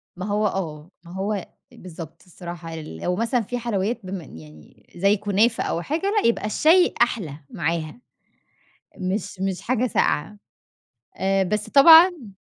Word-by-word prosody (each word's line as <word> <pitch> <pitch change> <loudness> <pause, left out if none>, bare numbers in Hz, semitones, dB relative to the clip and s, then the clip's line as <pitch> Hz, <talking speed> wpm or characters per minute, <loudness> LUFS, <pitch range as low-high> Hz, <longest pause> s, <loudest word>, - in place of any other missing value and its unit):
ما 185 +2 -6
هو 210 +1 0
آه 165 -3 -5
ما 170 - -13
هو 195 +3 -2
أ 195 - -4 0.3
بالضبط 165 -3 -11
الصراحة 170 -2 -9
ل 150 - -8
لو 180 - -1
مثلًا 230 +3 0
في 245 +4 -4
حلويّات 230 0 -2
بما 185 -2 -6
إن 80 - -13
يعني 75 -1 -16
زي 200 +4 +2
كنافة 210 +3 +1
أو 170 - -2
حاجة، 310 - -3 0.2
لأ - - +2
يبقى 230 - -2
الشاي 320 - +4
أحلى 185 - 0
معاها. 165 +4 -3 1.0
مش 185 0 -4
مش 190 -1 -2
حاجة 255 0 0
ساقعة 205 0 0 0.8
آآ 195 0 +1
بس 210 +3 -2
طبعًا 320 - +7
195 Hz, 155 wpm, -23 LUFS, 170-230 Hz, 1.0 s, طبعًا